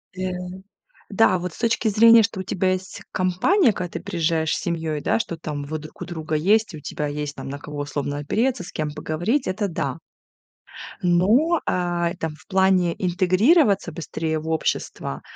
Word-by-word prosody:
Да. 185 0 -2 0.8
Да, 225 -4 +4
вот 180 0 -4
с - - -14
точки 230 -1 +1
зрения, 230 +2 +7
что 205 -3 -2
у - - -1
тебя 185 0 0
есть 185 +1 -5
компания, 215 - +3
когда 180 -3 -4
ты - - -4
приезжаешь 165 -4 0
с - - -4
семьёй, 160 -3 -2
да, - - +1
что 170 -6 -3
там 150 -2 -5
вы 155 +2 -4
друг 155 +1 -12
у - - -2
друга 160 -3 -4
есть. 205 +6 +2
И - - -5
у - - -11
тебя 150 +1 -4
есть 145 0 -4
там - - -7
на 140 - -5
кого 150 0 -8
условно 145 0 -3
опереться, 215 - 0
с - - -10
кем 155 -1 -2
поговорить, 175 - -1
это 200 +2 -1
да. 145 -4 -3 1.0
Но, 215 - +3
а, 175 -1 0
и 175 - -7
там 160 -3 -4
в 155 - -21
плане 190 -3 +3
интегрироваться 190 - +3
быстрее 160 0 -3
в 160 +1 -6
общество, 155 - -2
175 Hz, 190 wpm, -23 LUFS, 155-200 Hz, 1.0 s, зрения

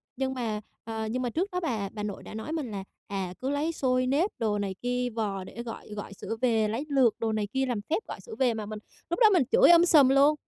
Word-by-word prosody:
Nhưng 265 +1 -1
mà, 225 -5 -2 0.2
ờ, 220 -1 -4
nhưng 250 +4 -2
mà 250 - -1
trước 355 - -1
đó 360 - -1
bà 225 - -2
bà 210 0 -6
nội 205 -2 -5
đã - - -9
nói 220 +8 -5
mình 305 -8 -3
là, 195 -2 -4 0.2
à, 190 -3 -3
cứ 260 - -2
lấy 290 +3 0
xôi 255 -5 +1
nếp 305 +10 +2
đồ 210 -2 0
này 200 -1 -2
kia 245 0 0
vò 200 -4 -2
để 235 +5 -8
gọi 230 -2 -8
gọi 205 -1 -6
sữa 225 - -5
về, 225 -4 +3
lấy 230 +7 -2
lược 265 -5 +4
đồ 225 -1 0
này 215 -1 -1
kia 265 +5 0
làm 245 -5 -2
phép 330 +8 0
gọi - - -6
sữa 450 - -9
về, 250 -3 +3
mà 220 -1 -4
mình 215 0 -6 0.3
lúc 345 - -1
đó 445 -3 +8
mình 350 -7 +5
chửi - - +7
um 340 0 +8
sùm 305 -6 +6
luôn: 280 +3 +5
245 Hz, 270 wpm, -28 LUFS, 215-280 Hz, 0.3 s, đó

